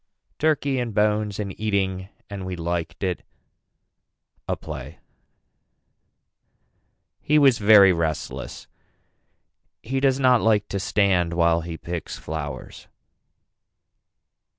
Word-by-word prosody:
TURKEY 145 -4 +1
AND 120 -4 -4
BONES 105 -1 +1
AND 100 -3 -5
EATING 95 -3 -1 0.2
AND 100 -2 -7
WE 95 0 -4
LIKED 85 +2 -4
IT 90 -2 -1 1.3
A - - 0
PLAY - - -8 2.2
He 150 - +2
was 135 -5 +5
very 100 -3 +7
restless. 80 -3 -4 1.2
He 135 +3 -2
does 135 -1 +2
not 125 -3 +4
like 105 -2 +2
to 100 - -2
stand 95 -4 +1
while 85 0 +2
he 85 0 -6
picks 85 0 -6
flowers. 75 -4 -7
100 Hz, 105 wpm, -23 LUFS, 85-110 Hz, 2.2 s, very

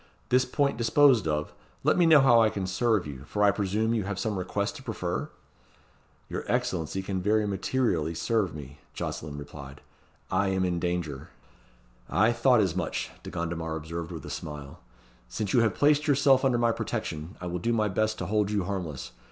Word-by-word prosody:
"This 130 +1 +4
point 140 0 0
disposed 120 - +4
of, 75 -1 -1 0.3
let - - +4
me 175 -2 +4
know 155 -3 +8
how 120 -3 +6
I 110 - +4
can 100 -3 -3
serve 100 +2 +1
you, 70 -2 -8
for 105 +7 -1
I 100 - +6
presume 105 +3 0
you 110 -3 0
have 100 -1 -3
some 110 0 -1
request 100 +2 -2
to - - -11
prefer?" - - -3 1.0
"Your - - -4
Excellency 90 +2 -1
can 95 -1 -3
very 105 +2 +2
materially 95 -5 0
serve 105 -6 0
me," 70 0 -9 0.2
Jocelyn 75 -1 -5
returned. 70 -1 -9 0.5
"I 95 +2 +2
am 95 -1 +1
in 90 -1 -1
danger." 85 -6 -3 0.8
"I 105 +8 +3
thought 120 -1 +4
as 90 -4 0
much," 90 -3 -2
De - - -8
Gondomar 80 -1 -3
observed 80 +2 -5
with 80 -4 -7
a - - -7
smile. 75 -2 -7 0.5
"Since 100 - -3
you - - +5
have 115 -1 +2
placed 150 +1 +3
yourself 135 -2 +4
under 130 -3 +3
my 120 0 +3
protection, 80 -4 -4
I 90 - -7
will 90 0 -3
do 115 +7 0
my 110 -2 +2
best 110 +2 0
to - - -4
hold 105 -1 +1
you 105 -2 0
harmless. 85 -10 -4
100 Hz, 190 wpm, -28 LUFS, 85-115 Hz, 1.0 s, know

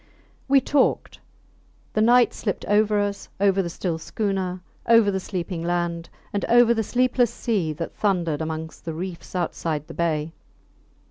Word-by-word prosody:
We 275 0 +5
talked. 285 -1 +1 0.7
The 215 - +1
night 240 +2 +5
slipped 200 -4 -3
over 210 0 +3
us, 205 0 -3
over 195 -1 +3
the 175 - -3
still 170 -1 -3
schooner, 190 -1 -2 0.3
over 230 -3 +6
the 190 - -1
sleeping 180 -2 -4
land, 175 -1 -2 0.2
and 200 - -1
over 235 0 +5
the 225 - 0
sleepless 245 +1 +2
sea 210 -10 -1
that 165 +2 -5
thundered 175 -7 0
amongst 160 0 -5
the 165 -2 -4
reefs 180 +1 -7
outside 160 -3 -2
the 165 - -10
bay. 160 -1 -1
190 Hz, 150 wpm, -24 LUFS, 170-215 Hz, 0.7 s, over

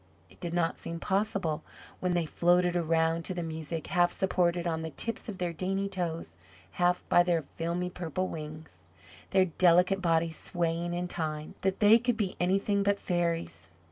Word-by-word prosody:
It - - -19
did 175 -1 -4
not 165 -1 0
seem 170 0 -5
possible, 190 -5 -1 0.4
when 180 -1 0
they 170 -2 +1
floated 175 +2 +2
around 165 0 +1
to 185 - -3
the 175 - -2
music, 160 0 -4
half 175 -2 +2
supported 180 -2 +1
on 160 -1 -1
the 160 - -4
tips 230 +10 -4
of 200 - -5
their 175 -2 -2
dainty 195 +4 -1
toes, 170 - -4 0.3
half 180 0 +1
by 175 - +6
their 175 -2 +1
filmy 170 +5 -3
purple 180 +1 -3
wings, 155 -1 -8 0.5
their 190 -1 +4
delicate 180 +2 +4
bodies 165 -2 +1
swaying 175 0 -1
in 180 +1 -2
time, 155 -3 -4
that 190 +1 -1
they 215 +2 +7
could 245 -1 0
be 200 -4 -1
anything 195 +3 +1
but 200 0 +1
fairies. 165 - -2
175 Hz, 175 wpm, -29 LUFS, 165-185 Hz, 0.5 s, they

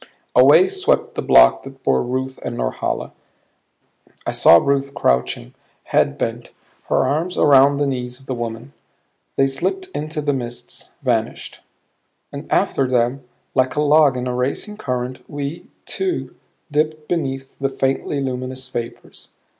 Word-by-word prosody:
Away 375 - +7
swept 390 +5 0
the - - -3
block - - +6
that 135 0 -13
bore 65 -1 +2
Ruth 130 +1 -3
and - - -4
Norhala; - - -2 1.1
I - - -1
saw 85 - +7
Ruth 140 +6 0
crouching, 65 -1 0 0.3
head - - +1
bent, - - -3 0.4
her - - +2
arms 165 +5 -1
around 140 -1 +5
the 145 - +1
knees 125 -2 -3
of 135 - -19
the 130 - -3
woman. 120 +2 -5 0.6
They 135 - +3
slipped 375 - -2
into 155 +1 -4
the 145 -1 0
mists; 120 -2 -6
vanished. - - -2 0.7
And - - -8
after 135 - +2
them, 125 +2 0 0.3
like 130 -1 +1
a 150 - +1
log 150 -2 +4
in 125 - -3
a 125 - -2
racing 135 +12 -2
current, 125 - -4
we, 145 +3 -5 0.2
too, 375 -2 -2 0.4
dipped 155 +1 -1
beneath 135 -5 -3
the 135 0 0
faintly 135 +2 -1
luminous 130 0 -4
vapors. 115 0 -7
135 Hz, 145 wpm, -20 LUFS, 125-150 Hz, 1.1 s, Away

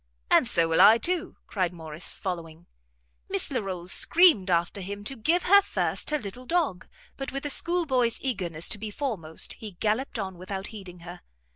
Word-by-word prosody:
"And - - +5
so 170 -7 +3
will 165 - +3
I 225 - +8
too," 350 +7 -1
cried 185 -4 -2
Morrice, 160 -1 -6
following. 170 -3 -6 0.6
Miss - - +3
Larolles 185 -3 -3
screamed 320 - +4
after 175 +3 0
him 200 +2 -7
to 270 +6 -5
give 330 +10 +1
her 400 +2 +6
first 400 - -2
her 300 - +1
little 250 +1 -8
dog; 320 - -1 0.3
but 270 - -5
with 275 +1 -5
a 290 - +2
schoolboy's 270 -9 +2
eagerness 180 - -2
to 210 - -3
be 215 +1 -5
foremost, 205 - -2
he 215 -3 -8
galloped 220 +9 -2
on 190 -4 -5
without 190 +1 -6
heeding 185 -4 -11
her. 175 +1 -10
205 Hz, 175 wpm, -26 LUFS, 175-270 Hz, 0.6 s, I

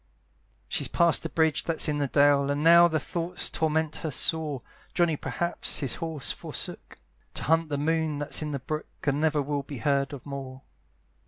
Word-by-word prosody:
She's - - -1
past 170 -2 +3
the - - -4
bridge 160 -2 +1
that's 165 -2 +1
in 150 -1 0
the 140 - +1
dale, 140 0 +4
And 145 +1 0
now 170 +1 +8
the 160 -2 0
thought 170 +5 -3
torments 160 -1 0
her 160 - -3
sore, 150 -1 0 0.4
Johnny 170 -3 +3
perhaps 160 +6 -1
his 135 -5 -2
horse 160 -4 -1
forsook, - - -6 0.4
To - - -4
hunt 165 +2 +2
the 145 - -1
moon 160 0 0
that's 145 +2 0
in 155 - -3
the 145 - -2
brook, 155 +4 -5 0.2
And 145 0 0
never 155 -2 +2
will 145 0 -2
be 140 0 -8
heard 140 +3 +1
of 140 -4 -9
more. 135 -2 -7
150 Hz, 185 wpm, -27 LUFS, 140-160 Hz, 0.4 s, now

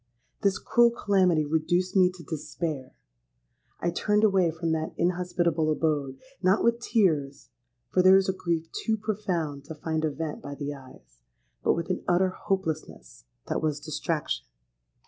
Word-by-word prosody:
This 200 -1 +2
cruel 240 0 +4
calamity 190 -8 +2
reduced 175 +5 0
me 185 -2 +6
to 180 -2 -12
despair. 155 -4 -5 0.9
I 175 - +1
turned 210 +4 +1
away 195 -5 +4
from 165 +1 -2
that 160 0 -2
inhospitable 175 -2 +1
abode,—not 160 - 0
with 235 0 +3
tears, 155 - 0 0.4
for 185 - +4
there 185 +1 +8
is 195 - +2
a 190 - +1
grief 170 -3 -2
too 220 -1 -1
profound 180 -9 -2
to 160 - -8
find 160 +1 -2
a 155 - +2
vent 150 +1 -5
by 140 0 -7
the 145 0 -4
eyes—but - - -6
with 170 +2 -2
an 180 - -2
utter 180 +1 +3
hopelessness 165 - -4 0.2
that - - -2
was 155 -2 0
distraction! 150 - -3
165 Hz, 145 wpm, -27 LUFS, 150-190 Hz, 0.9 s, there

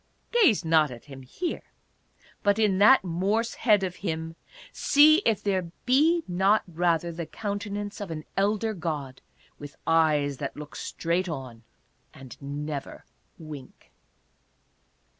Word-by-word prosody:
Gaze 360 - +4
not 160 -2 +4
at 120 -2 -11
him 135 -2 -11
here, 330 - -4 0.8
but 205 0 +2
in 205 -4 +2
that 235 +4 +7
Morse 195 +6 -1
head 210 -4 +3
of 185 -1 -3
him 165 -3 -4 0.4
see 305 +2 +5
if 210 -2 +1
there 185 -4 -1
be 310 +7 +3
not 190 +4 +2
rather 170 0 0
the 170 -1 -6
countenance 205 0 -5
of 200 - -5
an 155 -2 -5
elder 210 +3 +1
god, 150 -7 -5 0.4
with 145 0 -10
eyes 150 -4 +2
that 140 0 -5
look 150 0 -9
straight 175 +2 -2
on 130 -7 -7 0.5
and 135 -2 -11
never 145 +1 -6 0.3
wink. 150 -5 -11
175 Hz, 130 wpm, -26 LUFS, 150-205 Hz, 0.8 s, that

